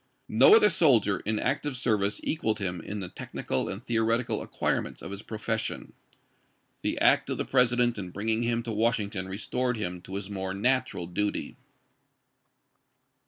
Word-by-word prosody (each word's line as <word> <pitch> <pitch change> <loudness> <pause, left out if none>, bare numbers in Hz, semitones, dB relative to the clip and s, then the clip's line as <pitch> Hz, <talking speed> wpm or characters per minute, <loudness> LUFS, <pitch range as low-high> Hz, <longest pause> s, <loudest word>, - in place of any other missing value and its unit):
No 435 - +7
other 210 - +7
soldier 120 - +4
in 110 +1 -2
active 135 +3 -1
service 105 -5 0
equaled 110 -9 0
him 90 -4 -2
in 100 +4 -5
the 90 - -5
technical 65 - -2
and 100 +5 -6
theoretical 115 +1 0
acquirements - - -2
of - - -7
his 100 0 -6
profession. 110 -1 -4 0.9
The - - -1
act - - +3
of - - -1
the - - -2
President 125 -3 +2
in 90 -2 -5
bringing 110 +5 0
him 120 0 0
to 115 - -4
Washington 105 -4 0
restored 125 +5 -2
him 90 -4 -4
to 95 - -8
his 100 -1 -4
more 95 -2 -4
natural 125 -3 0
duty. 100 +4 -2
110 Hz, 155 wpm, -27 LUFS, 100-125 Hz, 0.9 s, No